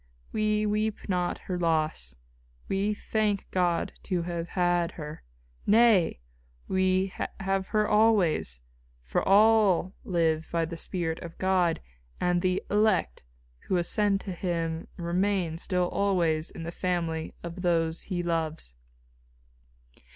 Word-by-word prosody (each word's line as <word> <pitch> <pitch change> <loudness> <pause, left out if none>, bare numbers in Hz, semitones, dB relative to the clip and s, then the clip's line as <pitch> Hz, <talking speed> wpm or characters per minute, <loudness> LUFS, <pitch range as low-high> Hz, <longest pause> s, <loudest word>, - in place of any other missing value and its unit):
"We 215 0 +1
weep 215 0 -1
not 180 -2 0
her 180 -2 -4
loss; 155 - 0 0.5
we 195 +2 0
thank 210 -1 -1
God 175 -2 0
to 180 -3 -1
have 170 -1 -4
had 175 0 +2
her. 150 -1 -8 0.5
Nay! 215 - +4 0.5
we 190 0 +1 0.3
have 195 0 -1
her 215 -1 +1
always, 205 - +3 0.4
for - - 0
all 200 -3 +4
live 165 -6 0
by 165 -1 +1
the 170 +1 -6
spirit 165 -1 -2
of 170 -1 -9
God; 185 -3 +1 0.4
and 180 0 +1
the 185 0 0
elect 205 - +2 0.5
who 185 - +2
ascend 195 +3 +1
to 195 - -6
Him 165 -2 -2
remain 175 -1 0
still 180 -1 0
always 170 -6 +1
in 165 - -8
the 170 - -4
family 170 -3 -2
of 170 +2 -6
those 165 -2 +1
He 180 -3 -3
loves." 160 - -2
180 Hz, 125 wpm, -28 LUFS, 165-195 Hz, 0.5 s, Nay